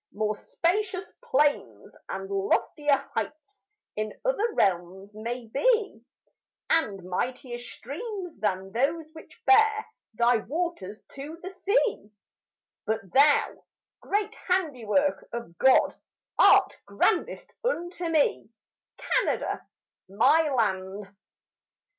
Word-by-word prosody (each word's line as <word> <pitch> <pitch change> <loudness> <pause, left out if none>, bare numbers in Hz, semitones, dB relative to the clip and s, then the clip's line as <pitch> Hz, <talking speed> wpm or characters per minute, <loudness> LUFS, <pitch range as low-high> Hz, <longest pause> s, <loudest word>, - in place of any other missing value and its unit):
More 215 +1 -1
spacious 370 - -2
plains 260 - 0
and 195 0 -4
loftier 265 +9 +1
heights 395 +7 -6 0.3
In 215 0 -4
other 475 -2 +1
realms 190 +2 0
may 235 +3 -5
be, 400 - +1 0.7
And 205 - +1
mightier 240 +7 -3
streams 360 - -7
than 195 -2 -1
those 305 +7 -1
which 320 - -14
bear 435 +1 +5 0.3
Thy 235 +1 +4
waters 225 - -4
to 290 +4 -8
the 375 - -6
sea; 400 - 0 0.8
But 215 -4 -3
thou, 285 +2 +4 0.4
great 415 +1 -1
handiwork 290 - 0
of 235 -8 -6
God, 265 0 +5 0.4
Art - - +6
grandest - - 0
unto 350 -7 -2
me, 310 -8 +1 0.5
Canada, - - -1 0.4
my 300 +11 +4
land. 200 -5 -2
275 Hz, 100 wpm, -27 LUFS, -, 0.8 s, Art